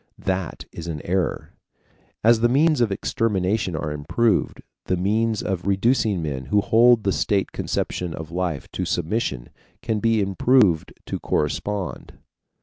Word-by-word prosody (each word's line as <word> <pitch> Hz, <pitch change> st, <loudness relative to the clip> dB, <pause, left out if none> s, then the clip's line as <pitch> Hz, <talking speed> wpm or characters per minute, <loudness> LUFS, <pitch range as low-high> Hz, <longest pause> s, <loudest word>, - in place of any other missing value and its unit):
That 95 Hz, -3 st, -3 dB
is 85 Hz, -, -8 dB
an 80 Hz, -3 st, -4 dB
error. 90 Hz, 0 st, -1 dB, 0.7 s
As 115 Hz, +1 st, +5 dB
the 120 Hz, +1 st, +3 dB
means 150 Hz, +2 st, +3 dB
of 115 Hz, -4 st, +2 dB
extermination 95 Hz, -2 st, 0 dB
are 75 Hz, 0 st, -3 dB
improved, 105 Hz, +10 st, 0 dB, 0.2 s
the 95 Hz, -, 0 dB
means 110 Hz, +4 st, 0 dB
of 95 Hz, -2 st, -3 dB
reducing 100 Hz, -2 st, +2 dB
men 70 Hz, -4 st, -4 dB
who 105 Hz, +11 st, +2 dB
hold 115 Hz, +1 st, +4 dB
the 100 Hz, -, +1 dB
state 100 Hz, 0 st, 0 dB
conception 90 Hz, -3 st, -3 dB
of 80 Hz, 0 st, -8 dB
life 85 Hz, -4 st, -2 dB
to 95 Hz, -, -3 dB
submission 85 Hz, -, -2 dB, 0.3 s
can 110 Hz, -2 st, -1 dB
be 115 Hz, 0 st, +2 dB
improved 100 Hz, -3 st, +3 dB
to -, -, -4 dB
correspond. 95 Hz, +5 st, -3 dB
95 Hz, 145 wpm, -23 LUFS, 85-115 Hz, 0.7 s, As